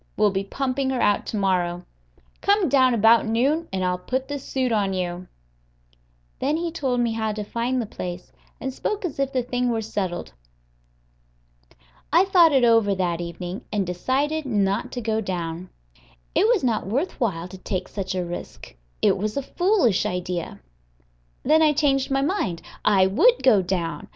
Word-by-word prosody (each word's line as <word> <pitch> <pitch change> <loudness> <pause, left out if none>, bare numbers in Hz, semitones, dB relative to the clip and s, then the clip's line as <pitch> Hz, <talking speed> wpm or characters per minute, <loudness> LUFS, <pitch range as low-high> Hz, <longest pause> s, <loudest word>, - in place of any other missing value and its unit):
We'll 210 -1 +4
be 195 0 -1
pumping 265 +5 -2
her 260 -2 -1
out 205 0 +2
to 215 - -3
morrow. 180 -3 0 0.6
Come 400 -4 +3
down 255 -2 +4
about 225 +1 +5
noon, 275 +9 +1
and 185 -1 -1
I'll 180 0 0
put 260 +7 -3
the 285 -1 -4
suit 260 -2 -2
on 200 -3 +1
you." 180 -1 -3 1.1
Then 290 +4 0
he 335 0 -2
told 265 -6 -1
me 235 -1 +1
how 220 -1 -1
to 210 0 -4
find 235 +4 -2
the 235 - -1
place, 180 -3 -7 0.3
and 265 -1 -4
spoke 410 +7 -3
as 310 -5 -5
if 275 -1 0
the 255 -2 0
thing 245 0 -1
were 225 -2 -1
settled. 185 - -4 1.8
I 340 +5 +5
thought 355 -4 +5
it 265 -3 +3
over 225 -4 +4
that 175 -2 -1
evening, 175 +2 -6
and 205 -3 0
decided 270 - -1
not 205 +2 0
to 245 - -3
go 220 -1 -1
down. 175 -2 -4 0.6
It 420 - +3
was 465 - +2
not 225 -6 0
worth 270 - -2
while 180 -9 -1
to 185 +1 -11
take 185 -1 -3
such 190 -2 -4
a 180 -1 -1
risk; 175 0 -8 0.3
it - - +4
was 215 +5 -2
a 280 - -1
foolish 350 - +2
idea. 180 - -4 0.8
Then 310 +3 +4
I 305 -1 +5
changed 275 -3 +1
my 270 0 +1
mind: 275 - -1 0.2
I 195 -3 +4
would 465 - +3
go 220 -7 +5
down. 175 -2 -3
225 Hz, 175 wpm, -24 LUFS, 185-270 Hz, 1.8 s, about